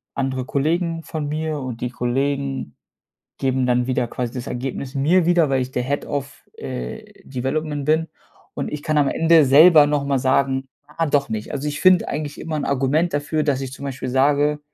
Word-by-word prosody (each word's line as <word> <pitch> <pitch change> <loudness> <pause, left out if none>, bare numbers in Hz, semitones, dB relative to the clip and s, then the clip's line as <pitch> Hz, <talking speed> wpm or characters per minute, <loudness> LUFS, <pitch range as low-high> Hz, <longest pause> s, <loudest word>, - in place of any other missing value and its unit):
andere 130 -1 -2
Kollegen 165 +4 -1
von 155 -3 -4
mir 155 0 -2
und 125 -3 -6
die 125 - -1
Kollegen 135 - -2 0.6
geben 130 -1 0
dann 125 0 +1
wieder 125 -2 0
quasi 120 0 -4
das 125 -1 -5
Ergebnis 130 +2 -5
mir 160 +6 +3
wieder, 175 -3 +4
weil 130 -1 +2
ich 130 - -7
der 125 - -1
Head 140 +3 -2
of, 140 -1 -5
äh, 60 0 -6 0.2
Development 140 +3 -3
bin. 160 +2 +2 0.5
Und - - -4
ich 150 -1 -5
kann 155 -1 +1
am 145 -2 +3
Ende 165 0 +4
selber 150 +3 +7
noch 145 -1 0
mal 140 -1 +1
sagen: 135 +1 +1 0.2
„Ah, 160 +2 -2
doch 140 -1 +1
nicht.“ 110 -1 -4
Also 140 +1 -3
ich 145 0 -4
finde 185 -2 +5
eigentlich 145 0 -4
immer 160 -1 -4
'n 145 - -2
Argument 140 +5 +1
dafür, 150 +2 -1
dass 135 -2 0
ich 130 - -5
zum 140 - -9
Beispiel 130 -1 -5
sage: 145 +3 +2
140 Hz, 195 wpm, -21 LUFS, 130-155 Hz, 0.6 s, selber